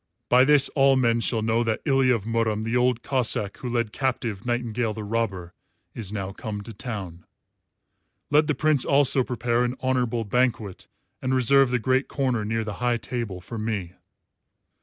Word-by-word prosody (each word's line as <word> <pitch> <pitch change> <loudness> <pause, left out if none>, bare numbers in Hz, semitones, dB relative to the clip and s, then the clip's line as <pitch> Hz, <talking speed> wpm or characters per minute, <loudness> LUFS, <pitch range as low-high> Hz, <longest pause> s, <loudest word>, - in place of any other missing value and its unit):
By 125 +1 +6
this 145 -1 +6
all 135 -1 +3
men 120 -3 +2
shall 115 -1 0
know 115 +1 +1
that 110 -1 -2
Ilya 135 -3 +3
of 110 - -4
Murom 115 -2 -1
the 115 +2 -2
Old 125 -1 +1
Cossáck 115 -6 0
who 125 - -6
led 115 -3 -1
captive 120 -5 -3
Nightingale 120 -2 -1
the 110 - -6
Robber 100 -5 -3 0.4
is 105 -4 -5
now 100 -2 -4
come 105 +1 -6
to 115 +2 -10
town. 95 -7 -6 1.1
Let 150 +1 +4
the 150 - 0
Prince 155 -4 +2
also 140 -1 +4
prepare 120 0 -1
an 125 +1 -2
honourable 125 -3 0
banquet 110 -3 -1 0.3
and 130 0 0
reserve 135 +1 +4
the 125 - +1
great 130 +3 0
corner 130 -5 -1
near 115 +2 -2
the 105 -1 -5
high 120 -1 +1
table 115 -6 -5
for 115 +5 -7
me. 105 -5 -3
120 Hz, 175 wpm, -24 LUFS, 110-130 Hz, 1.1 s, By